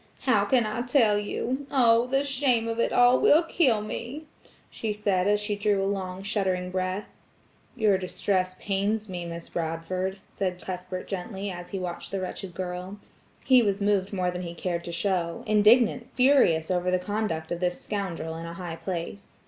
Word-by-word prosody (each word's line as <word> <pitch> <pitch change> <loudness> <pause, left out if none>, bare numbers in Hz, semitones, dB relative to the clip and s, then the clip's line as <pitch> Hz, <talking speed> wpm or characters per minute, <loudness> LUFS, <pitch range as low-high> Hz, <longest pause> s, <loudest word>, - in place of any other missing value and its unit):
"How 215 -6 +3
can 240 +2 +3
I 215 +2 -2
tell 240 -5 +3
you? 255 +6 -3
Oh! 235 -2 +4
the 270 +2 +1
shame 255 -4 +1
of 230 0 -3
it - - +2
all 245 +1 +5
will 315 +4 +5
kill 270 -10 +2
me," 240 +8 -6 0.5
she 220 - -3
said 200 -3 0
as 210 0 +3
she 210 0 -2
drew 205 -1 +1
a - - 0
long 190 -1 -3
shuddering 190 -3 -1
breath. 185 +2 -2 0.7
"Your 210 -5 +3
distress 185 0 -1
pains 210 +2 -1
me, 180 -2 -5
Miss 170 0 -7
Bradford," 175 +4 -3
said 185 -2 -3
Cuthbert 185 0 -6
gently 195 +1 -4
as 175 -1 -8
he 195 - -4
watched 180 -2 -5
the 195 - -3
wretched 185 -1 -6
girl; 180 +2 -5 0.5
he 255 -2 +6
was 200 -3 0
moved 200 -2 +1
more 185 -3 0
than 180 0 -5
he 170 -1 -6
cared 170 0 -3
to 170 - -5
show–indignant–furious 215 - +3
over 180 0 +1
the 185 - +3
conduct 180 -4 -3
of 175 - -2
this 180 0 -1
scoundrel 180 -6 -4
in 165 +1 -6
a 170 - -7
high 170 -2 -6
place. 185 +3 -6
195 Hz, 175 wpm, -27 LUFS, 180-220 Hz, 0.7 s, he